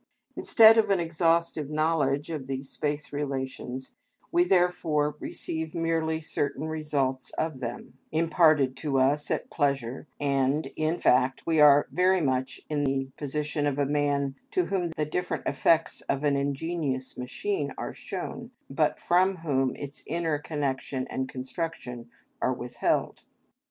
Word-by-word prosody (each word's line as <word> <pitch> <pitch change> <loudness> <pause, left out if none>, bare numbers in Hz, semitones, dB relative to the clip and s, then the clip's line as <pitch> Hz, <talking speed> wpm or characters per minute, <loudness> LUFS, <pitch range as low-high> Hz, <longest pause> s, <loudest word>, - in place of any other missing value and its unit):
Instead 225 0 +7
of 215 -2 +2
an 195 -2 +3
exhaustive 165 -2 +1
knowledge 155 -1 +1
of 145 -5 -5
these 135 0 -4
space 150 0 -3
relations 130 -2 -4 0.4
we 345 0 +4
therefore 175 - +2
receive 160 -1 -4
merely 165 -1 0
certain 145 -1 -2
results 145 -4 -1
of 155 -4 -2
them, 120 +1 -7
imparted 155 -4 +3
to 135 0 -1
us 140 +3 +2
at - - -2
pleasure, 140 -2 -1
and 140 +1 +1
in 155 +2 0
fact 125 +1 +2
we 160 -2 +2
are 145 -1 +7
very 185 +1 +3
much 130 -4 -1
in 150 -1 -1
the 135 -1 0
position 150 +1 -2
of 145 -1 -1
a 145 - +2
man 140 -1 0 0.2
to 365 - +1
whom 180 -3 -1
the 155 -2 -2
different 180 +4 -3
effects 165 -1 +2
of 140 +1 0
an 145 -1 +3
ingenious 140 -1 -2
machine 385 - -3
are - - -4
shown, 235 -1 -6 0.2
but 150 +2 +1
from 185 +2 +3
whom 135 -3 +1
its 145 +1 -7
inner 165 -3 -1
connection 140 -3 -2
and 130 0 -2
construction 130 -3 -5 0.3
are 130 - +2
withheld. 120 -1 -1
145 Hz, 140 wpm, -27 LUFS, 135-165 Hz, 0.4 s, Instead